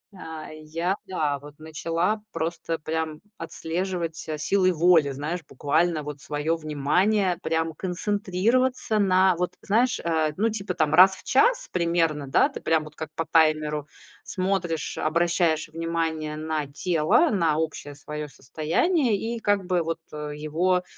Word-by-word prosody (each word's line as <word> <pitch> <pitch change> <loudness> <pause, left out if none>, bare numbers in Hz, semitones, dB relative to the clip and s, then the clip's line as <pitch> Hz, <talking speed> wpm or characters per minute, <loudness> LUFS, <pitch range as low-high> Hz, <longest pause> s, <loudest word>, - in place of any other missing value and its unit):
А-а. 160 -3 -8
Я 160 +4 -2
да, 150 -6 -1
вот, 145 +1 -13
начала 165 +6 -1
просто 165 0 -3
прям 155 0 -3 0.2
отслеживать 165 0 -3
ся 155 -1 -5
силой 185 +4 +2
воли, 165 -3 +4
знаешь, 150 +6 -3
буквально 155 +3 +1
вот 145 -1 -7
своё 150 +3 -1
внимание 175 +6 +1
прям 160 0 0
концентрироваться 210 +6 0
на 190 -2 +4
вот 180 0 -1
знаешь, 235 +5 +2
э, 160 -2 +1
ну, 225 +3 +2
типа 195 -4 -4
там 155 -1 +1
раз 190 +3 +8
в - - -15
час 465 - +3
примерно, 170 -4 0
да, 135 - +4
ты - - -8
прям 160 -1 +2
вот 150 0 -12
как 160 -1 -6
по 165 - -2
таймеру 155 -2 +2 0.4
смотришь, 185 -4 -2
обращаешь 165 0 +1
внимание 160 -1 -2
на 155 -1 -2
тело, 165 - +2
на 165 -6 +2
общее 145 -3 -4
своё 150 +1 -6
состояние 205 - 0
и 230 +2 -3
как 205 -3 +1
бы 180 -2 +1
вот, 165 0 -3
э, 150 0 -5
его, 175 +5 +1
165 Hz, 145 wpm, -25 LUFS, 155-185 Hz, 0.4 s, раз